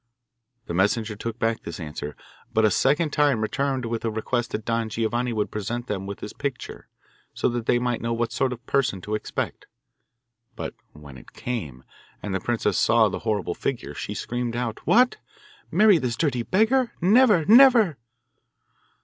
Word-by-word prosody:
The - - -5
messenger 105 +4 +1
took 115 +2 -5
back 115 -1 0
this 85 - -7
answer, 75 -2 -6 0.4
but 110 0 +3
a 105 - +3
second 150 - +2
time 145 -5 +3
returned 130 +3 -1
with 115 0 -3
the 115 - -1
request 115 +2 -2
that 110 - -5
Don 115 -1 -1
Giovanni 120 +3 -1
would 105 -2 -2
present 120 +3 -4
them 95 -4 -4
with 100 - -7
his 105 - -7
picture, 140 -3 -5 0.5
so - - +1
that 120 -1 -4
they - - +4
might 120 -1 -1
know 115 - -2
what 115 0 -1
sort 130 -2 0
of 120 -1 -6
a 120 - -42
person 130 -8 +1
to 105 - -5
expect. 105 - -4 0.9
But - - -5 0.2
when 75 -4 -12
it - - -18
came, 75 - -5 0.4
and 105 - -3
the 95 - 0
princess 110 -2 0
saw 115 -2 +4
the - - -4
horrible 105 -5 -1
figure, 130 +5 -4
she - - -5
screamed 120 -1 -3
out, 120 -2 -3
'What! 250 +2 +4 0.5
marry 210 -5 +5
this 125 -4 -2
dirty 135 -6 0
beggar? 225 - +2
Never, 205 -2 +5
never! 230 - +6
115 Hz, 175 wpm, -24 LUFS, 105-140 Hz, 0.9 s, never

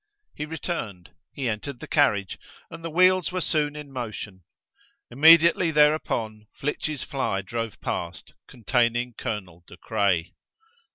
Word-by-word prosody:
He 150 - -5
returned; 145 - -5 0.2
he 135 -3 -4
entered 120 +4 -4
the - - -8
carriage, 105 -10 +1 0.3
and 165 - -10
the 165 - -4
wheels 185 +3 +3
were 185 - -2
soon 150 -4 0
in 150 -2 -9
motion. 110 -6 -6 0.7
Immediately 165 +5 +6
thereupon, 150 -9 +1
Flitch's 150 0 -3
fly 100 -8 -2
drove 115 +2 -5
past, 85 -1 -5
containing 120 +1 0
Colonel 95 -7 -6
De 90 - -13
Craye. 100 -5 0
125 Hz, 125 wpm, -25 LUFS, 105-155 Hz, 0.7 s, Immediately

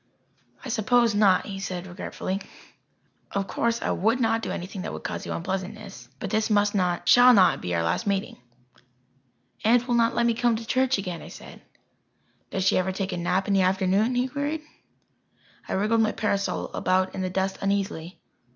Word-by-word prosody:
"I - - -5
suppose 235 0 +2
not," 200 -3 +4
he 195 -2 -6
said 185 -2 -5
regretfully. 190 +1 -5 0.9
"Of 200 -1 -1
course 235 +4 -1
I - - 0
would 225 +6 +1
not 225 -1 +1
do - - -4
anything 185 +2 -5
that 210 - -5
would - - -7
cause - - -5
you - - -4
unpleasantness. 195 +3 -5
But 195 - -5
this 220 +1 +1
must 205 -1 +2
not 180 -3 0
shall 245 0 +8
not 190 -3 +4
be 90 -1 -2
our 85 - 0
last 145 - -1
meeting." 200 -1 -1 1.3
"Aunt 240 +3 +3
will 245 - 0
not 230 -1 +2
let 235 - +2
me 235 - +3
come 235 0 +1
to 225 +1 -6
church 260 +1 +1
again," 180 -4 -5
I - - -10
said. - - -12 0.9
"Does 190 - -2
she 190 - +4
ever 185 +1 0
take 190 0 -3
a - - -3
nap 180 +2 0
in 200 - +1
the 195 - +4
afternoon?" 190 +5 +2
he 250 +1 +1
queried. 295 +3 -3 1.1
I - - -2
wriggled 215 +4 +2
my 220 - +1
parasol 200 -2 -1
about 185 0 +1
in 190 - -4
the 185 - -1
dust 190 +1 -2
uneasily. 195 -4 -2
200 Hz, 190 wpm, -25 LUFS, 190-230 Hz, 1.3 s, shall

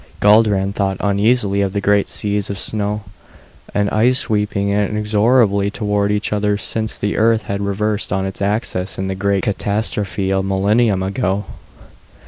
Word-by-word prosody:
Guldran 105 -2 +3
thought 95 -2 -1
uneasily 100 0 +1
of 95 -1 -1
the 100 - 0
great 100 0 +2
seas 105 -1 -2
of 100 - -4
snow 105 +1 -1 0.7
and 105 0 0
ice 125 +4 +3
sweeping 105 -4 +1
inexorably 105 +1 +2
toward 105 -1 -1
each 105 +1 -1
other 105 0 0
since 110 +1 -2
the 105 - -2
Earth 115 0 +2
had 100 0 -4
reversed 105 +1 -2
on 95 +1 0
its 95 +1 -6
axis 100 -2 -1
in 95 - -3
the 95 - -2
great 100 0 0
catastrophe 100 -1 -1
a 95 0 +1
millennium 100 +1 +1
ago. 95 +1 -1
100 Hz, 150 wpm, -18 LUFS, 100-105 Hz, 0.7 s, Guldran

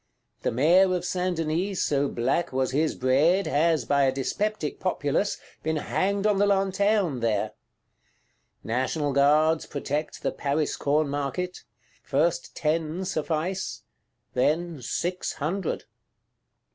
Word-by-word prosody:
The - - 0
Mayor 180 +9 +4
of 180 0 -3
Saint 180 -1 -1
Denis, 170 +5 -1
so 145 -1 +1
black 130 +8 0
was 130 0 0
his 150 +3 +1
bread, 150 +10 +3
has, 155 -3 +2
by 140 +2 +3
a 135 - +3
dyspeptic 155 +6 -2
populace, 185 +1 0 0.2
been 160 0 -1
hanged 195 +6 0
on 210 -2 +3
the 205 - +4
Lanterne 195 - +2
there. 110 -3 0 1.1
National 130 +5 -1
Guards 155 +3 +3
protect 145 +2 -3
the - - +1
Paris 145 +2 -1
Corn 150 +2 +1
Market: 145 +6 -3 0.4
first 155 +5 0
ten 160 +3 -1
suffice; 175 +2 -2 0.5
then 155 +3 0
six 175 +9 -2
hundred. 170 +4 -2
155 Hz, 120 wpm, -26 LUFS, 140-180 Hz, 1.1 s, Mayor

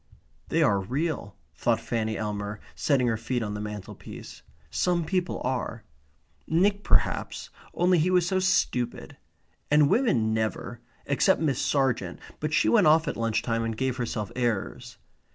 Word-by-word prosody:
They - - +3
are 100 -1 +3
real, 130 - -3 0.2
thought - - +1
Fanny 110 -2 -2
Elmer, 105 -1 -4
setting 135 -4 +1
her 115 -2 +1
feet 120 +2 -2
on 105 -1 -3
the 105 - -4
mantelpiece. 105 -2 -8 0.3
Some 175 -2 +1
people 180 +1 -1
are. 125 -3 -2 0.6
Nick 200 +5 +2
perhaps, - - 0 0.2
only 180 0 +3
he 165 +4 +2
was 180 -2 +3
so 190 +1 +1
stupid. 180 -9 0 0.5
And 150 -1 +5
women 120 - +2
never 110 +2 -2 0.3
except 145 +7 +3
Miss 145 -6 0
Sargent, 130 -10 0 0.2
but 155 0 -2
she - - +3
went 210 -8 +5
off 160 +1 +5
at - - -1
lunch 115 -1 0
time 115 -1 0
and 115 -1 -3
gave 130 0 -1
herself 110 -4 -3
airs. 120 -5 -2
125 Hz, 155 wpm, -27 LUFS, 110-160 Hz, 0.6 s, And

